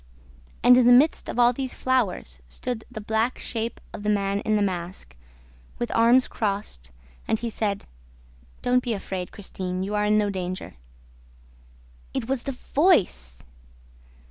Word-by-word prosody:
And, 250 0 +8
in 250 -1 +5
the 245 - +8
midst 280 +6 +4
of - - -5
all 240 0 +5
these 260 0 -4
flowers, 205 - -1
stood 220 - -5
the 245 -3 -7
black 220 +4 0
shape 230 0 -4
of - - -7
the 210 - -1
man 200 -1 +1
in 215 +1 0
the 210 - +2
mask, 180 -1 -4 0.6
with 240 - -3
arms 235 +3 +5
crossed, 200 - -3 0.4
and 220 - +2
he 235 +1 -4
said, 205 -2 -2 0.8
'Don't 250 0 +3
be 240 -2 -2
afraid, 190 -3 -5
Christine; 185 -2 -4
you 200 +2 -4
are 210 0 +1
in 210 0 +3
no 205 -1 +1
danger.' 185 -1 -5 1.4
IT 225 - -2
WAS 265 -1 -1
THE 275 - -3
VOICE! 205 - +1
215 Hz, 155 wpm, -25 LUFS, 195-245 Hz, 1.4 s, And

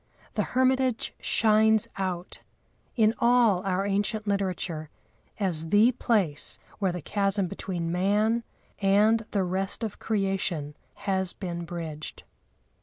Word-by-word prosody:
The - - 0 0.2
hermitage 260 -2 +2
shines 220 -1 +3
out, 185 -2 -4 0.5
in 220 -3 +4
all 235 -6 +4
our 190 +1 0
ancient 205 +2 -1
literature, 185 -6 -2 0.5
as 165 -5 0
the 210 +6 +5
place 195 - 0 0.2
where 195 -3 +1
the 175 -3 -6
chasm 200 -1 0
between 170 -2 -4
man 210 +6 +2 0.4
and 210 +3 +4
the 200 -2 0
rest 190 +5 -1
of 215 -2 -4
creation 195 -8 -1 0.3
has 190 -2 0
been 170 -2 -5
bridged. 160 -3 -6
195 Hz, 115 wpm, -27 LUFS, 180-215 Hz, 0.5 s, the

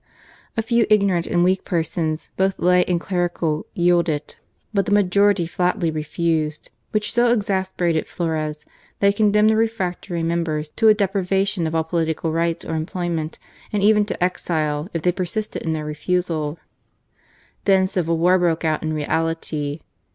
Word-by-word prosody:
A 225 - +1
few 235 0 +2
ignorant 200 -5 +3
and 175 0 +2
weak 185 +1 +2
persons, 160 -2 -2
both 190 0 +1
lay 180 0 +4
and 175 -1 0
clerical, 175 -4 -1
yielded: 170 -4 +1 0.4
but 200 -2 +1
the - - -1
majority 200 -1 +3
flatly 180 0 0
refused, 155 0 -2 0.2
which 210 -1 -1
so 240 0 +3
exasperated 190 -6 0
Flores 155 -3 -3 0.3
that 200 - +4
he - - +2
condemned 210 +1 +4
the - - +2
refractory 190 -6 -1
members 165 -2 -1
to 225 +7 +1
a 215 - +7
deprivation 195 -2 0
of 160 - -3
all 160 - +2
political 160 -1 -1
rights 165 +1 -1
or - - -4
employment 160 -1 -3 0.3
and 205 -2 0
€ven 210 0 +4
to 180 - -2
exile, 155 -3 -1
if 165 -2 -4
they 180 - +3
persisted 190 +4 -3
in 160 - -1
their 155 -1 -3
refusal. 155 0 -1 1.1
Then 190 -1 +4
civil 180 -4 0
war 180 +3 +4
broke 170 -2 +1
out 155 -1 +1
in 155 -1 -2
reality. 155 -1 -2
175 Hz, 155 wpm, -21 LUFS, 160-195 Hz, 1.1 s, a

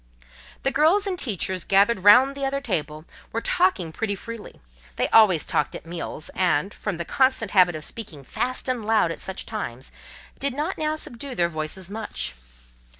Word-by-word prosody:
The 270 - +2
girls 340 +9 +3
and 370 -3 -2
teachers, 190 -5 -2
gathered 200 +2 +3
round 250 +7 +7
the 280 - -5
other 275 +1 0
table, 155 - -3 0.3
were 230 - -1
talking 230 - +1
pretty 205 +4 -2
freely: 230 +2 -9 0.4
they - - +1
always 200 -8 +5
talked 150 - 0
at - - -8
meals; 165 -2 -3
and, 185 +1 +1
from 205 -5 -4
the 170 - -4
constant 260 -3 +2
habit 180 -4 +5
of 155 0 -5
speaking 165 -11 -6
fast 255 - -2
and 250 -3 -1
loud 215 -5 +2
at - - -6
such 190 - -4
times, 135 - -5 0.5
did 275 -2 -1
not 305 +6 -2
now 310 0 0
subdue 265 -2 -7
their 170 -1 +2
voices 155 +3 -4
much. 215 +2 -4
210 Hz, 175 wpm, -24 LUFS, 175-260 Hz, 0.5 s, round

